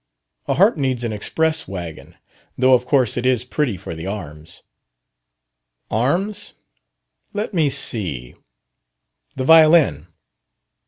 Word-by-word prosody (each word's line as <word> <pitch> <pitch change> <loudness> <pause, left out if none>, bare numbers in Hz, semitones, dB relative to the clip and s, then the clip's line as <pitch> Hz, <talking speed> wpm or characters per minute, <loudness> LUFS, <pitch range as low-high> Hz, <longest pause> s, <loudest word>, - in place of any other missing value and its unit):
"A - - 0
harp 200 +2 +4
needs 130 -4 -1
an 115 -2 -2
express 160 +9 -1
wagon. 85 -4 -8 0.4
Though 130 +1 +4
of 125 0 +2
course 130 -6 +1
it 120 - -1
is 125 -2 +1
pretty 125 -6 -1
for 85 - -8
the 80 +2 -7
arms." 80 -5 -8 1.3
"Arms? 185 - -1 0.8
Let 210 +1 -4
me 160 -5 +2
see. 80 - -2 1.0
The - - -3
violin?" 155 - +5
125 Hz, 115 wpm, -20 LUFS, 95-155 Hz, 1.3 s, violin